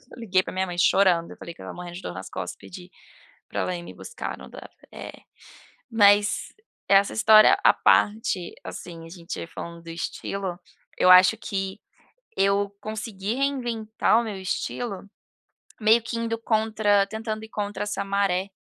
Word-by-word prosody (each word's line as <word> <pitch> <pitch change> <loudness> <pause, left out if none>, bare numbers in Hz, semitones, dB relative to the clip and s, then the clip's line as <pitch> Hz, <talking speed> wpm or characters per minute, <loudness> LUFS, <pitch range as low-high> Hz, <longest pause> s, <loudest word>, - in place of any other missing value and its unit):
liguei 195 -6 +1
pra - - -7
minha 190 0 0
mãe 175 -1 -6
chorando, 175 -1 +3
eu - - -11
falei 170 - -9
que - - -16
estava - - -8
morrendo 175 -1 -8
de 180 - -8
dor - - -6
nas 95 +1 -8
costas, 90 -1 -5
pedi 90 -2 -12 0.6
pra - - -2
ela 180 - -2
ir 175 - -6
me 175 - -10
buscar, 470 - -7
não - - -12
dava - - -11 0.2
é. - - -8 0.8
Mas 205 -2 +3 0.3
essa 200 0 +4
história, 215 -1 +6
à - - +7
parte, 205 -4 +2
assim, 165 -2 -8
a - - -11
gente 170 -1 -7
falando 170 0 -8
do 165 - -12
estilo, 180 +2 -4 0.4
eu 185 - +4
acho 185 +3 +8
que 195 -1 -4 0.6
eu 200 +1 +2
consegui 215 -1 -4
reinventar 240 -5 0
o - - -3
meu 215 -3 -5
estilo, 195 +2 -4 0.8
meio 220 +2 +5
que 230 +1 -5
indo 230 0 -2
contra 220 -3 +2
tentando 220 +1 -5
ir 220 - -10
contra 205 -1 -4
essa 210 0 -3
maré 195 -1 0
200 Hz, 170 wpm, -25 LUFS, 180-220 Hz, 0.8 s, acho